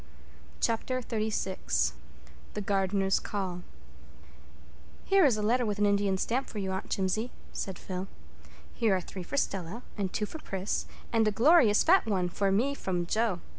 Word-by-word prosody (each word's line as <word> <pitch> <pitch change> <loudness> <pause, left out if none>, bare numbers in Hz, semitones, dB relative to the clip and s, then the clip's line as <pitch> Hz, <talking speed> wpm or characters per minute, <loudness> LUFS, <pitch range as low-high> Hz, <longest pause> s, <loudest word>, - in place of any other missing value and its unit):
Chapter 255 +3 0
XXXVI 215 - -1 0.6
The 210 - -2
Gardners'Call 195 -1 0 1.4
"Here 390 -3 +5
is 245 -6 +4
a 210 - -2
letter 245 +4 +2
with 210 -3 -1
an 205 - +3
Indian 200 -1 +2
stamp 250 +7 -1
for - - -8
you, 190 -2 -2
Aunt 190 0 -4
Jimsie," 205 +5 0 0.2
said 190 -2 -4
Phil. 185 0 -5 0.7
"Here 220 -4 +2
are 185 - -1
three 185 +2 -8
for 230 +10 -5
Stella, 195 0 -2 0.2
and 190 -2 -1
two 210 - -1
for 315 - -8
Pris, 195 -7 -3 0.3
and 225 -1 +4
a - - +3
glorious 235 -2 +5
fat 365 -5 +5
one 185 -4 +1
for 195 +2 0
me 245 +9 +2
from 180 -9 -2
Jo. 215 -1 0
205 Hz, 160 wpm, -29 LUFS, 190-230 Hz, 1.4 s, Here